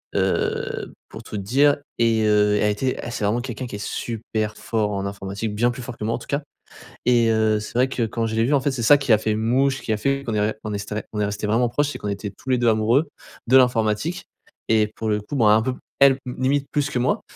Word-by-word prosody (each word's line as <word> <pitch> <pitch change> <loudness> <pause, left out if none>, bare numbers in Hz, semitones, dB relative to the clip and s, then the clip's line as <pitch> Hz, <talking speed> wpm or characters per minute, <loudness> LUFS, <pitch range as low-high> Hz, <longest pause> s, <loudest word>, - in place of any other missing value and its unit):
heu, - - -1 0.2
pour - - -10
tout - - -8
te - - -3
dire, 140 +8 +3 0.2
et 115 -1 +3
heu, 105 -1 +3
elle 105 - +3
était 130 +5 -1
elle 120 - -5
c'est 110 - -2
vraiment 110 +4 +1
quelqu'un 125 0 -5
qui 110 - -7
est 100 - -6
super 110 -2 -3
fort 110 -2 -1
en 100 0 -2
informatique, 100 +2 -4
bien 120 +3 +2
plus 125 +1 -8
fort 120 -1 -8
que 105 - -4
moi, 115 - 0
en - - -5
tout - - -12
cas. 140 +1 -1 0.6
Et 120 -2 +4
heu, 110 -1 +2
c'est 105 - -7
vrai 125 +2 +3
que 130 -2 -2
quand 115 +1 -2
je 110 0 -3
l'ai 115 - +2
vu, 130 +6 +1
en 140 - +4
fait, 140 +2 0
c'est 130 -3 -3
ça 145 +6 +7
qui 135 -4 +2
a - - +6
fait 110 0 -1
mouche, 130 +5 +1
qui 110 - -1
a - - -1
fait 140 +4 -1
qu'on 115 - -2
est 105 - +1
on - - +2
ré 110 - 0
on 105 - -3
est 105 +1 -4
on 105 - -1
est - - +2
resté 105 +1 -3
vraiment 115 +3 +2
proche, 145 +5 0
c'est - - -6
qu'on 105 - -4
était 100 0 -4
tous 130 - -10
les 130 - +3
2 120 -1 +1
amoureux, 115 +7 +3 0.4
de 130 - +4
l'informatique 125 - +2 0.4
et 110 -1 +3
pour 110 - -3
le 105 0 0
coup 105 +8 -7
bon, 115 -4 +4
un 105 +1 +5
peu 130 - -1
p - - -12 0.2
elle 140 -1 +7
m 125 - -5
limite 135 +2 +1
plus 145 -1 0
que 125 - -2
moi. 125 - +1
115 Hz, 280 wpm, -22 LUFS, 105-130 Hz, 0.6 s, ça